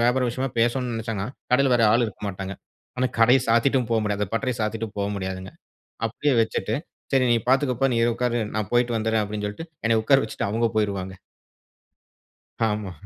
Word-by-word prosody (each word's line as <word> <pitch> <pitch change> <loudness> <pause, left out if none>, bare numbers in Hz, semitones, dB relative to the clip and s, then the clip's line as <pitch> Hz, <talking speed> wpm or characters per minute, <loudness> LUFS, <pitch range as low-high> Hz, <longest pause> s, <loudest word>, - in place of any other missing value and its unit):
வியாபாரம் 125 +1 +2
விஷயமா 130 +3 -2
பேசணுனு 120 +1 +1
நினச்சாங்கனா. 115 -2 -3 0.2
கடையில 135 +1 +4
வேற 120 - +3
ஆள் 120 +2 +4
இருக்க 105 - -10
மாட்டாங்க. 95 0 -5 0.5
ஆனா, 130 - +3
கடைய 125 +3 +6
சாத்திட்டு 125 +4 +3
போ 115 - +3
முடியாது. 105 -1 -1
அந்த 100 - -1
பட்டறைய 125 0 -1
சாத்திட்டு 110 +1 -2
போ 100 - 0
முடியாதுங்க. 95 -1 -5 0.6
அப்டியே 135 +5 0
வச்சிட்டு 110 -1 -1 0.4
"சரி 135 -2 +3
நீ 120 - +4
பார்த்துக்கோ 130 0 +3
பா 135 - +5
நீ - - +1 0.2
உட்காரு. 120 -1 0 0.2
நான் 105 -3 -2
போய்ட்டு 120 -1 +2
வந்துடுறேன் 110 0 +1
அப்டினு 105 0 -4
சொல்லிட்டு 160 +12 -7 0.2
என்னைய 115 -1 +3
உட்கார 135 +4 +5
வச்சிட்டு 110 - -3
அவங்க 115 +3 +1
போய்ருவாங்க. 100 -3 -1 1.5
ஆமா. 105 -3 -1
115 Hz, 175 wpm, -24 LUFS, 105-125 Hz, 1.5 s, கடைய